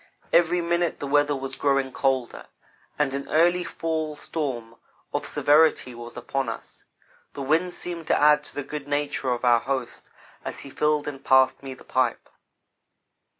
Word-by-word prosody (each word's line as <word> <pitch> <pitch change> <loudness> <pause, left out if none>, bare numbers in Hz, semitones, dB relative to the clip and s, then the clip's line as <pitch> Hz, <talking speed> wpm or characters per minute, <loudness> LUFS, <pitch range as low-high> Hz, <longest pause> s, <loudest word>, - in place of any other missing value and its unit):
Every 175 +1 +4
minute 170 0 0
the - - -4
weather 145 +1 +2
was 135 0 -5
growing 135 -2 +1
colder, 130 -3 -1 0.5
and 145 -2 +1
an 140 0 -4
early 175 +3 +3
fall 160 -2 -3
storm 125 -8 -4 0.4
of - - -2
severity 150 -4 +3
was 120 0 -10
upon 130 +1 -2
us. 115 - -8 0.5
The 140 - -5
wind 165 +6 +1
seemed 170 -3 -4
to - - +3
add 150 0 +5
to - - -9
the 145 - -3
good 145 0 -7
nature 145 -2 -1
of 125 0 -1
our 120 -1 +5
host 135 +2 -4 0.3
as - - -5
he 140 - -10
filled 150 0 +1
and 140 -2 -6
passed 130 -1 +4
me 135 -1 -7
the - - -16
pipe. 130 -3 -1
145 Hz, 165 wpm, -25 LUFS, 130-155 Hz, 0.5 s, add